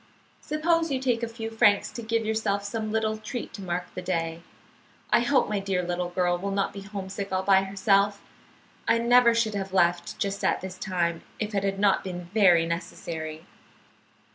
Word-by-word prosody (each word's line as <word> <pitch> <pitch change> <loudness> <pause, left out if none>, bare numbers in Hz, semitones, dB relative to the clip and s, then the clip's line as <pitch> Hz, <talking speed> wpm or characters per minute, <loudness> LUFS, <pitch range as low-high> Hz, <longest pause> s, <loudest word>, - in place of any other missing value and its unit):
Suppose 330 +2 +1
you 265 - 0
take 245 -3 0
a 235 - -1
few 225 0 -6
francs 220 -3 +3
to 235 - -6
give 225 0 -1
yourself 215 -2 0
some 215 +1 -3
little 220 0 0
treat 220 +3 -6
to 200 - -8
mark 180 -1 -2
the 185 - -5
day. 165 -2 -2 0.7
I - - +6
hope 250 +3 +2
my 210 -1 -1
dear 195 -2 -1
little 175 0 -2
girl 175 0 0
will 200 +2 -3
not 195 0 -1
be 200 - -7
homesick 195 0 -6
all 185 0 0
by 190 -1 +5
herself. 200 +1 +2 0.7
I 230 - +4
never 235 0 +5
should 225 -2 +1
have 195 -2 -4
left 175 -2 +1
just 200 0 -2
at - - +2
this 185 0 -7
time 170 -4 -1 0.2
if 215 0 -3
it 200 -1 0
had 195 0 -1
not 200 -1 +3
been 180 -2 -6
very 180 -6 +5
necessary." 160 -1 -5
200 Hz, 190 wpm, -26 LUFS, 180-220 Hz, 0.7 s, I